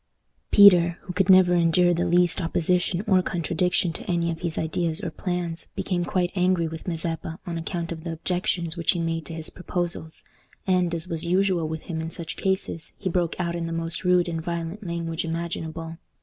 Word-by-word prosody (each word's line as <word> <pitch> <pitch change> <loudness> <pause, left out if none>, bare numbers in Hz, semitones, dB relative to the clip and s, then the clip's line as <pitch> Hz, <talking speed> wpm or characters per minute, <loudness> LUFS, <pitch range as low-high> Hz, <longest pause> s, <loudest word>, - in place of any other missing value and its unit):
Peter, 175 -4 +7
who 180 - -7 0.2
never 185 -1 +7
could 175 - +4
endure 175 +1 +4
the 175 +1 0
least 175 +2 +3
opposition 175 +2 +1
or 185 -2 +5
contradiction 175 0 0
to - - -8
any 170 -1 +1
of 165 - -5
his 170 -2 -2
ideas 160 0 -1
or 170 - -4
plans, 175 -2 -3
became 180 -2 -1
quite 180 0 0
angry 180 -3 +2
with 160 +2 -8
Mazeppa 165 -1 -3
on 175 - -4
account 170 0 -4
of 160 -1 -6
the 165 -1 -3
objections 175 0 -1
which 170 -2 +2
he 175 - -3
made 165 -1 -2
to 165 - -6
his 160 -1 -3
proposals, 175 -3 -3 0.4
and, 180 -2 +2
as 165 +1 -3
was 165 -2 -3
usual 180 -1 +1
with 160 0 -5
him 160 -2 -4
in 160 - -4
such 165 -2 -6
cases, 190 -4 -2
he 190 - -2
broke 175 -1 0
out 170 -1 -1
in 170 -1 -3
the - - -4
most 165 +1 -2
rude 180 -1 +3
and 165 -1 -3
violent 170 +4 -4
language 170 -2 -3
imaginable. 165 0 -4
170 Hz, 195 wpm, -25 LUFS, 165-180 Hz, 0.4 s, Peter